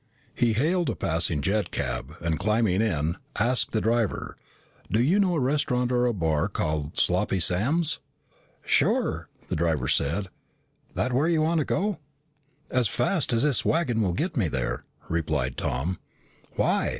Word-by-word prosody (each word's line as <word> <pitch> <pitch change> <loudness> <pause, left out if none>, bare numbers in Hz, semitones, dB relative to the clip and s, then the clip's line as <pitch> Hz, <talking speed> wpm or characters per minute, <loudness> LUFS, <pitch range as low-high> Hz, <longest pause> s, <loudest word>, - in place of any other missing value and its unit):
He 120 -3 +2
hailed 165 - +1
a - - -1
passing 80 -3 0
jet 105 +4 0
cab, 60 -1 -4
and 80 -2 -1
climbing 105 -2 +2
in, 85 -7 0 0.2
asked 120 +5 +1
the 110 - 0
driver, 115 -1 -1 0.6
"Do 110 - +2
you 160 - +3
know 185 -3 +2
a - - +1
restaurant 125 -2 0
or 125 0 +2
a - - +2
bar 80 -6 0
called 75 -1 -3
Sloppy 95 - +2
Sam's?" 140 - +2 0.7
"Sure," - - +1
said - - -29
the - - -1
driver. 80 -5 0 1.1
"That 125 - -1
where 140 +6 +2
you 165 -2 +2
want 165 +1 +2
to 150 - 0
go?" 205 0 -1 0.7
"As 125 -3 +2
fast 125 - 0
as 115 +1 +2
this 150 -4 +3
wagon 130 -9 +1
will 95 -4 +1
get 165 - -2
me 110 - +1
there," 65 -3 -3 0.2
replied 75 -6 -1
Tom. 75 +9 -2 0.6
"Why?" - - +1
110 Hz, 160 wpm, -26 LUFS, 80-140 Hz, 1.1 s, you